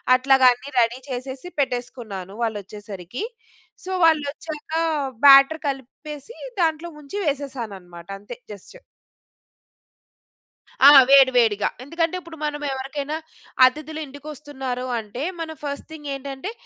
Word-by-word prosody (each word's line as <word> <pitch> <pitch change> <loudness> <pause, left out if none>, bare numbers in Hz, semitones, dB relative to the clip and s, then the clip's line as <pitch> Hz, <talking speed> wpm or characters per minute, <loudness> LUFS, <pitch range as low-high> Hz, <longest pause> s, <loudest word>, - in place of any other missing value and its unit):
అట్లాగా 265 0 +4
అన్నీ 260 +3 -11
రెడీ 235 +2 +2
చేసేసి 260 +6 -6
పెట్టేసుకున్నాను 240 -7 -3
వాళ్ళోచ్చేసరికి. 205 - -5 0.6
సో 375 - -5
వాళ్ళు 310 -3 +4
వచ్చాక 310 0 -9 0.5
బ్యాటర్ 275 +3 +8
కలిపేసి 285 - -7 0.2
దాంట్లో 320 +1 0
ముంచి 300 +7 -8
వేసేసానన్నమాట 220 - -5
అంతే 220 +4 -9 0.2
జస్ట్. 200 - -14 2.1
ఆ! - - +12 0.2
వేడి 270 -1 +8
వేడిగా. 210 -3 +3 0.2
ఎందుకంటే 330 +4 -1
ఇప్పుడు 335 -2 -12
మనం 295 0 -3
ఎవరికైనా 275 +3 -4 0.5
అతిథులు 305 +4 -1
ఇంటికి 285 +2 -12
వస్తున్నారు 265 -4 -5
అంటే 225 +6 -6 0.2
మనం 320 -1 -5
ఫస్ట్ 285 -1 -5
థింగ్ 295 -2 -9
ఏంటంటే 275 +7 -6
270 Hz, 110 wpm, -23 LUFS, 245-300 Hz, 2.1 s, ఆ